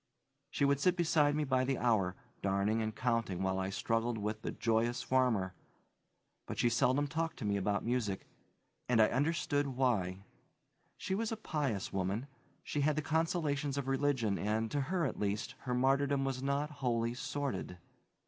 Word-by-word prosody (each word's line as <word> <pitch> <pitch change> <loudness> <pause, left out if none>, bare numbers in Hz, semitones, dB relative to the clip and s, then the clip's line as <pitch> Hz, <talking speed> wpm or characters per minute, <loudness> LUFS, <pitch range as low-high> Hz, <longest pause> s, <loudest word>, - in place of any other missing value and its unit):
She 140 - +1
would 140 0 +3
sit 180 +3 +3
beside 155 -4 +3
me 150 - +1
by 130 -2 +2
the 135 +1 0
hour, 105 -7 +2 0.3
darning 100 +3 +1
and 110 -1 -2
counting 115 -7 0
while 95 0 0
I 95 0 -1
struggled 115 +3 0
with 105 +1 -3
the - - -3
"Joyous 115 +1 0
Farmer," 120 -8 +2 0.9
but - - -5
she 120 - +3
seldom 130 +4 +2
talked 160 +3 -2
to 120 - -5
me 100 -1 +1
about 100 +1 0
music, 115 -5 -1 0.6
and 120 -2 +4
I 110 - +6
understood 145 0 +1
why. 110 -8 0 0.7
She - - -3
was 225 +3 -1
a 225 - -2
pious 145 - -2
woman; 95 +5 -1 0.4
she 145 - -2
had 150 +1 +2
the 155 - -1
consolations 150 -2 0
of 140 -2 -2
religion 135 -6 +1
and, 110 +2 0
to 145 - 0
her 170 +4 0
at 135 - -3
least, 105 0 -1
her 125 - -1
martyrdom 135 +2 +2
was 135 -1 -2
not 140 +2 0
wholly 120 -4 0
sordid. 135 -7 -3
130 Hz, 170 wpm, -34 LUFS, 110-145 Hz, 0.9 s, I